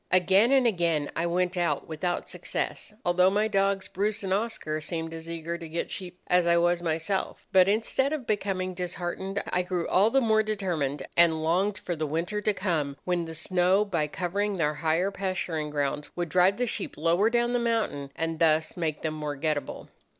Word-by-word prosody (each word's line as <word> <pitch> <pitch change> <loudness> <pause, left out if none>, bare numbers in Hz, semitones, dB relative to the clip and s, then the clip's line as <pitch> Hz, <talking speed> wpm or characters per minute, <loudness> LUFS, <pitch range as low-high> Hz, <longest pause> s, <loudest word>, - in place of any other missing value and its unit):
"Again 190 +6 +4
and 270 -2 +5
again 170 -8 +1
I 165 +1 0
went 180 +1 0
out 175 -1 0
without 175 +3 -2
success, - - -4
although 180 +1 +4
my 210 +2 +1
dogs, 195 -2 +1
Bruce 205 +2 -1
and 190 -1 0
Oscar, 195 -8 -2
seemed 165 0 -4
as 165 0 -8
eager 170 +1 -4
to 165 -2 -8
get 170 +2 -3
sheep 180 -1 -6
as 180 -1 +3
I 170 0 +4
was 175 0 +2
myself; 165 +4 -2
but 190 0 +6
instead 230 +6 +1
of 300 -5 -3
becoming 190 -4 -1
disheartened, 180 +2 -4
I 180 - +3
grew 180 -1 -2
all 200 +4 +4
the 270 - +3
more 220 -3 +3
determined, 175 -10 -2
and 165 -2 +4
longed 190 +5 +1
for 175 - -4
the 155 -1 -2
winter 170 +8 -2
to 210 - +2
come, 155 -8 -1
when 175 -2 0
the 165 0 -7
snow, 185 +4 +2
by 170 -7 -1
covering 195 +5 -2
their 150 -3 +1
higher 165 +5 0
pasturing 180 -6 -2
grounds, 145 0 -2
would 175 -1 -2
drive 185 +4 +4
the 245 - +1
sheep 235 - -4
lower 170 +7 +3
down 240 +1 +1
the 245 - +2
mountain, 220 -13 -1
and 165 0 -2
thus 155 -1 +2
make 160 -4 -3
them 160 -1 -1
more 150 -1 -4
getatable. 150 0 -2
180 Hz, 195 wpm, -27 LUFS, 160-200 Hz, -, but